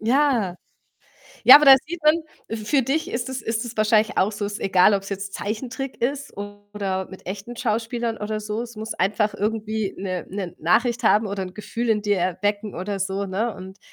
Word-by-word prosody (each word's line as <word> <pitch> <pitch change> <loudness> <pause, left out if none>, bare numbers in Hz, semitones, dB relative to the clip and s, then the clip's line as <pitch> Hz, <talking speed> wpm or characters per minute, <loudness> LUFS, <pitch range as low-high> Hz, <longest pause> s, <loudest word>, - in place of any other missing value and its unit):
Ja. 235 -6 +2 0.9
Ja, - - +11
aber 300 - +4
da 270 - +12
sieht 335 -1 -6
man, 305 +2 +5 0.3
f 220 -1 -5
für 280 -3 +3
dich 275 +6 -1
ist 235 +1 -3
es 265 0 -4
ist 225 +1 -2
es 235 -1 -8
wahrscheinlich 215 0 +3
auch 205 +3 +2
so, 205 0 -4
ist 205 0 -4
egal, 190 +1 +4
ob's 195 0 -2
jetzt 195 0 -4
Zeichentrick 250 +5 -5
ist, 280 +1 -2
oder 205 -2 -5
mit 190 - -13
echten 200 +5 -6
Schauspielern 230 0 -1
oder 215 +1 -3
so. 210 +2 -3
Es 235 -1 -9
muss 220 +1 -5
einfach 210 +2 +1
irgendwie 215 -1 -2
'ne 185 -2 -4
'ne 185 -3 -5
Nachricht 230 +8 +1
haben, 215 +1 +4
oder 195 -1 -3
'n 185 - -10
Gefühl 230 +2 -4
in 210 -2 +2
dir 205 -1 +1
erwecken, 205 +4 -1
oder 195 +3 -3
so, 195 +1 -2
ne, 210 +4 -2
und, 190 +1 -10
210 Hz, 200 wpm, -23 LUFS, 195-235 Hz, 0.9 s, da